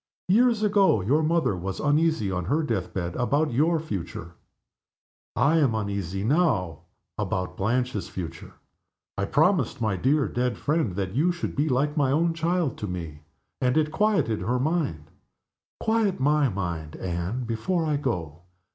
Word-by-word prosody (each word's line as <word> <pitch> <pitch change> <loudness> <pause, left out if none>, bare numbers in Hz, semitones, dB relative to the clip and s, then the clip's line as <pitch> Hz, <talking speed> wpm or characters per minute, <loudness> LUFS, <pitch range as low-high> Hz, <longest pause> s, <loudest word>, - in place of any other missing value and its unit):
Years 230 +2 +4
ago 200 - +4
your 135 +12 +2
mother 160 - +1
was 95 +2 -5
uneasy, 150 -8 +2
on 90 -1 -2
her 150 - +1
death 110 - -2
bed, 85 -2 -3
about 145 +3 +1
your 160 +6 +2
future. 95 - -5 1.0
I 150 +4 +3
am 130 -7 +2
uneasy, 100 -3 -3
now, 110 - +1 0.4
about 90 0 -2
Blanche's 120 +1 -1
future. 85 -3 -7 0.6
I - - -1
promised - - +2
my 110 -5 0
dear 140 +7 +2
dead 125 0 -1
friend 150 - 0
that 95 -1 -3
you 155 +9 +2
should 175 - -4
be 150 +3 +1
like 140 +3 +1
my 140 -3 +2
own 165 +4 +2
child 170 -3 -1
to 105 - -3
me 85 -5 -6 0.4
and 125 +3 +2
it 155 -1 +2
quieted 195 - +1
her 120 +7 0
mind. 130 - -1 0.7
Quiet 220 -5 +1
my 145 0 +3
mind, 85 -6 -4
Anne, 90 +7 -3
before 120 +10 -1
I 150 -2 +1
go. 90 - -3
125 Hz, 155 wpm, -26 LUFS, 95-155 Hz, 1.0 s, Years